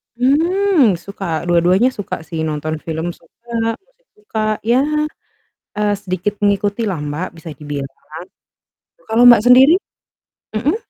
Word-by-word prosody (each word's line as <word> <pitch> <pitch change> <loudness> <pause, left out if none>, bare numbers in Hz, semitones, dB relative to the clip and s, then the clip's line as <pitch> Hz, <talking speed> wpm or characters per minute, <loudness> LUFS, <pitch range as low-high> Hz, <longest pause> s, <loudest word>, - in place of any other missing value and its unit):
Hmm, 310 - +3
suka. 170 -2 -5
Dua-duanya 180 +7 +3
suka 205 -6 -5
sih. 165 -1 -5
Nonton 155 +1 -3
film 160 +1 -3
suka, 230 +7 -5
musik - - -39
suka. 420 - -6 0.2
Ya, 235 +3 +2 1.0
eee, 210 0 +1
sedikit 185 +1 -3
mengikutilah, 205 -1 0
Mbak, 150 +5 -4
bisa 165 0 -10
dibilang. 145 -2 -6 1.1
Kalau 225 +2 +3
Mbak 240 -3 +8
sendiri? 260 +6 +7 0.8
Mhm? 270 +9 +1
205 Hz, 115 wpm, -18 LUFS, 170-245 Hz, 1.1 s, Mbak